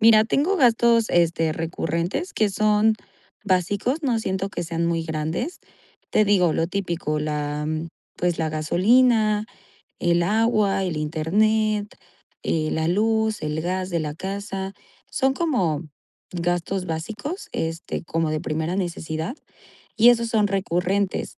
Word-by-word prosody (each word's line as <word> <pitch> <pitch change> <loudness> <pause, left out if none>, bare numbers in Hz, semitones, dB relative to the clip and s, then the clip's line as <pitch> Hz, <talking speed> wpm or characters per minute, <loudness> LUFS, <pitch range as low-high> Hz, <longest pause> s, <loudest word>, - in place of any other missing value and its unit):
Mira, 220 -1 +7
tengo 315 - +1
gastos, 235 -4 +4
este, 165 -2 +2
recurrentes 170 - -2
que 215 -2 +1
son 215 +2 +3 0.5
básicos. 205 - 0
No 245 -5 +1
siento 190 -2 -2
que 190 - -4
sean 170 0 -1
muy 165 -1 0
grandes. 160 - -3 0.5
Te 215 - +4
digo 185 -5 +3
lo 165 - 0
típico 170 -5 -2
la, 150 0 -2
mm, 155 +1 -3 0.3
pues, 175 -1 0
la 160 -1 0
gasolina, 215 +7 +3 0.5
el 175 0 +2
agua, 210 -1 +2
el 170 -4 -2
internet, 205 +8 +1 0.6
eh, 155 -1 0
la 160 0 0
luz, 220 +2 +1
el 155 +1 -2
gas 185 +2 -2
de 170 - 0
la 150 -1 -3
casa. 195 +1 -4 0.4
Son 265 -1 +1
como 190 - 0 0.5
gastos 175 +2 -1
básicos, 215 - -5
este, 165 +1 -3
como 165 -1 -1
de 155 0 -1
primera 160 +2 -2
necesidad. 170 - -3 0.6
Y 230 +2 +7
esos 235 -1 +3
son 215 -2 +2
recurrentes, 195 0 -1
185 Hz, 135 wpm, -23 LUFS, 165-215 Hz, 0.6 s, Mira